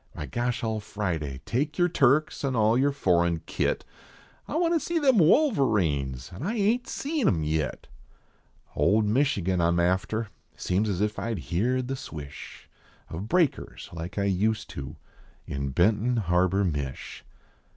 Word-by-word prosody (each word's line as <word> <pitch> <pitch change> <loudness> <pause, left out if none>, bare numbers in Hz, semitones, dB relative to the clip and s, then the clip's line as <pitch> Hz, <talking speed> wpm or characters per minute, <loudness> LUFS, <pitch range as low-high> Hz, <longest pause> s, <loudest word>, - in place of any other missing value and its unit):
Why. 75 - -6
gosh 120 - -2
all 110 -1 -1
Friday! 80 -10 -4
Take 145 +5 -1
yer 175 - +4
Turks 155 -3 +2
an 135 -2 0
all 110 0 +3
yer 140 +3 +3
foreign 85 - +1
kit, - - -1 0.6
I - - -5
want 335 +1 +2
to 330 - +3
see 340 +3 -2
them 265 -8 +4
Wolverines, 105 - +2
an 90 - -9
I 205 +10 -2
ain 220 +3 +2
t - - -15
seen 290 -4 -1
em 80 -5 +2
yit; 75 0 -2 0.9
Old 105 +9 +3
Michigan 105 -7 +1
I 85 - +3
m 85 0 +1
after; 100 +5 0 0.3
seems 100 +4 0
as 95 -1 -1
if 105 0 -1
I 115 -1 -2
heerd 120 +9 -1
the 135 - -2
swish 75 - -9 0.4
Of 90 +6 -5
breakers 175 -5 0
like 85 +3 -7
I 100 - +1
used 105 +3 0
to 65 -1 -7 0.5
in 70 0 -3
Benton 105 - +2
Harbor. 95 0 +2
Midi. 70 -6 -2
105 Hz, 160 wpm, -27 LUFS, 85-135 Hz, 0.9 s, yer